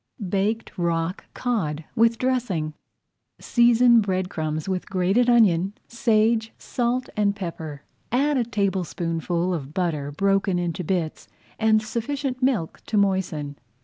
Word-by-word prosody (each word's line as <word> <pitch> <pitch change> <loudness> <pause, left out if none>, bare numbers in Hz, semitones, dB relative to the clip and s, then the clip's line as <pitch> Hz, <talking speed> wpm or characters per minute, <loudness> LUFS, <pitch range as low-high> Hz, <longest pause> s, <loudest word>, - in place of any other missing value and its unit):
BAKED 205 +4 0
ROCK 170 +1 -1
COD 165 -11 -2
WITH 230 0 +4
DRESSING 225 -12 -1 0.6
Season 240 0 +5
bread 185 -2 -1
crumbs 155 0 -3
with 185 -1 -2
grated 195 +6 +2
onion, 195 -5 +4
sage, 225 -1 +2
salt, 245 +1 -1
and 205 -2 +2
pepper. 160 -6 -6 0.3
Add 285 +5 +2
a 255 - +2
tablespoonful 180 -5 -1
of 150 -3 -5
butter 155 -6 -1
broken 195 +3 +1
into 175 0 -2
bits, 170 -2 -2 0.3
and 220 -1 +3
sufficient 255 +4 -3
milk 250 -11 0
to 215 - 0
moisten. 180 -8 0
195 Hz, 120 wpm, -24 LUFS, 170-235 Hz, 0.6 s, Season